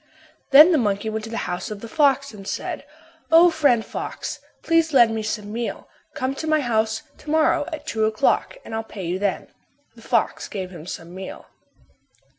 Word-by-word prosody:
Then 300 +6 +9
the 315 - +4
monkey 210 -1 0
went 220 0 -4
to - - -8
the 230 - -4
house 180 0 -4
of 210 -2 -7
the 230 - -7
fox 275 0 +2
and 195 -2 -11
said, - - -4 0.5
"O, 335 +2 +7
friend 280 -8 +2
fox, - - -5 0.2
please 330 -1 +2
lend 240 -4 +6
me 220 - -2
some 210 -1 -4
meal. 235 0 -4 0.3
Come 260 +1 -1
to 315 - -5
my 310 0 +3
house 220 -3 0 0.2
to 300 - -11
morrow 310 -1 +3
at 315 - -6
two 220 -1 0
o'clock 220 - +1
and - - -8
I'll 225 0 -2
pay 200 -4 -8
you 180 +2 -2
then." 200 -1 -2 0.5
The - - -15
fox - - 0
gave 190 -3 -5
him 170 -2 -10
some 170 -1 -7
meal. 190 0 -8
225 Hz, 195 wpm, -23 LUFS, 205-285 Hz, 0.5 s, Then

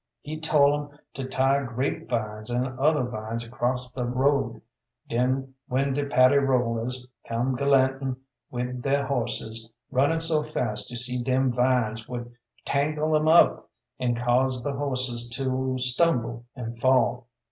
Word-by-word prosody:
He 155 +1 -6
tol' 145 -3 +4 0.2
'em 145 - -22 0.2
to 135 -1 -5
tie 135 +1 +2
grape 130 +1 -3
vines 110 -2 -2
an' 125 +1 -2
other 150 0 +3
vines 115 -1 -4
across 125 +2 -2
th' - - -23
road, 135 +3 +1 0.5
den 130 +3 0
when 135 +2 0
de 145 +1 -1
Paddy 130 +1 +5
rollers 125 -2 0 0.2
come 120 +3 0
galantin' 135 -1 +2 0.3
wid 125 0 -4
their 140 +2 +1
horses 115 -4 -3 0.2
runnin' 140 +5 +2
so 160 -2 +2
fast 125 -8 -3
you 120 - -7
see 125 +1 -1
dem 130 0 +1
vines 120 -3 +1
would 120 -1 -6 0.3
tangle 155 +2 +1
'em 155 0 +2
up 165 +2 +5 0.3
an' 125 -2 0
cause 125 +1 +1
th' 145 - -2
horses 130 -4 -1
to 130 -1 -1
stumble 125 -3 +2
and 120 -2 -6
fall. 125 -1 +2
130 Hz, 145 wpm, -26 LUFS, 120-140 Hz, 0.5 s, Paddy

